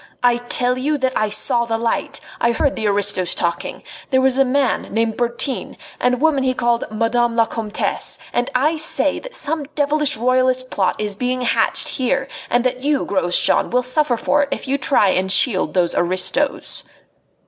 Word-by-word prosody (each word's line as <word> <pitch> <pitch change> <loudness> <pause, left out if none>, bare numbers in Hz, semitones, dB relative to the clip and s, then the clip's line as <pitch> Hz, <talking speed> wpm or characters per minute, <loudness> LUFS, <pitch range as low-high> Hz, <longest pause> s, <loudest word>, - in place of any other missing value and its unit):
"I 245 -1 +4
tell 245 +1 -1
you 295 +3 0
that 260 -1 -1
I 215 - 0
saw 235 +3 +2
the 225 -1 -2
light. 230 0 -2 0.2
I 235 0 +2
heard 280 +4 0
the 220 - -2
aristos 200 -3 +1
talking. 170 -1 -3 0.3
There 260 - +2
was 265 0 +2
a - - +6
man 270 -1 -1
named 225 0 0
Bertin, 240 +3 -2 0.2
and 250 0 +2
a - - -8
woman 290 0 +2
he 255 -1 0
called 240 -1 0
'Madame 230 +2 0
la 230 -1 +3
Comtesse,' 220 -2 -2 0.2
and 245 +1 0
I 300 +6 +2
say 320 +2 +1
that - - -11
some 305 0 -1
devilish 295 -2 +2
royalist 255 +1 +1
plot 190 -2 0
is 210 -1 -1
being 250 +4 -2
hatched 245 - 0
here, 265 +1 -1 0.2
and 240 0 +1
that 255 0 -2
you, 290 0 0
Grosjean, 180 -3 +2
will 250 +1 +1
suffer 255 -1 +1
for 295 +5 +1
it 285 - -1
if - - -4
you 275 +1 0
try 255 -7 +3
and 190 0 0
shield 195 -2 +3
those 175 -2 +1
aristos." 185 +11 -1
250 Hz, 185 wpm, -19 LUFS, 225-270 Hz, 0.3 s, a